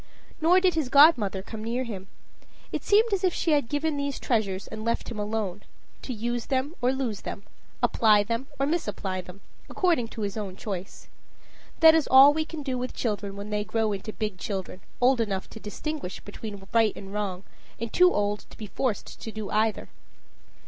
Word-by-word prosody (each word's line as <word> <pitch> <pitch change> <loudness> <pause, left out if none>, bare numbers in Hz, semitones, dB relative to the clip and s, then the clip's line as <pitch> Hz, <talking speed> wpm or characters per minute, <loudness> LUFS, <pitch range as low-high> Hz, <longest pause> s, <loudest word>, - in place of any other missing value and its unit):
Nor 350 +4 +6
did 370 -1 +3
his 315 -6 -1
godmother 245 - +5
come 215 +1 -7
near 240 +3 -1
him. 195 -6 -7 0.6
It - - -3
seemed 430 +2 +4
as 390 -1 0
if 365 -2 +2
she 330 - 0
had 285 -6 +2
given 295 +1 0
these 280 -1 -2
treasures 205 -5 0
and 220 0 -7
left 230 +1 -1
him 220 - -5
alone 205 -2 -2 0.4
to - - -6
use 240 +1 -3
them 270 +3 0
or 250 +1 +3
lose 260 -6 -2
them, 200 - -6 0.4
apply 210 -2 +5
them 230 +5 -3
or 275 - +1
misapply 205 - -2
them, 180 +2 -13 0.3
according 340 -11 +1
to 225 - -8
his 200 +1 -3
own 200 -3 -4
choice. 190 -2 -6 0.7
That 320 0 +9
is 320 -2 +2
all 270 +2 +8
we 315 +1 -1
can 320 -2 -7
do 260 -2 -2
with 250 +1 -4
children 205 -3 -2
when 200 +1 -7
they 210 0 0
grow 220 +2 0
into 200 +2 -4
big 210 -4 -4
children 190 -2 -5 0.2
old 250 0 +4
enough 195 -4 -2
to 220 - -9
distinguish 215 - -5
between 205 -1 -8
right 225 -2 +4
and 195 0 -9
wrong, 195 -3 -3 0.4
and 230 0 -5
too 360 0 +6
old 205 0 -1
to - - -15
be 215 - -6
forced 215 +1 -3
to 225 - -5
do 215 -2 -6
either. 215 0 +1
225 Hz, 195 wpm, -27 LUFS, 205-275 Hz, 0.7 s, That